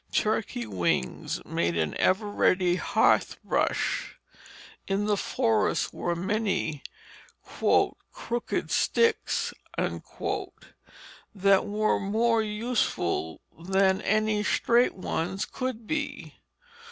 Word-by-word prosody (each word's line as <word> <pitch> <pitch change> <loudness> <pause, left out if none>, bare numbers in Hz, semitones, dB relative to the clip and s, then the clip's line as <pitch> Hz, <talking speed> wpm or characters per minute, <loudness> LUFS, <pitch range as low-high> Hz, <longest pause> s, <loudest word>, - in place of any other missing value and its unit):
Turkey 210 - 0
wings 85 -9 -2
made 85 0 -1
an 80 -2 -1
ever 190 +4 +2
ready 185 -3 +2
hearth - - +2
brush. - - -1 0.7
In 195 +1 0
the 210 -1 +2
forests 225 +1 0
were 175 0 -2
many 190 -5 -1 0.7
"crooked 240 0 -1
sticks" 460 -1 +1 0.2
that 195 -1 -2
were 215 +1 +1
more 225 +3 +2
useful 210 - -1 0.2
than 190 +2 +2
any 215 0 +1
straight 240 +3 +2
ones 185 +1 -2
could 255 -3 -4
be. 310 +6 -4
200 Hz, 90 wpm, -27 LUFS, 175-220 Hz, 0.7 s, ever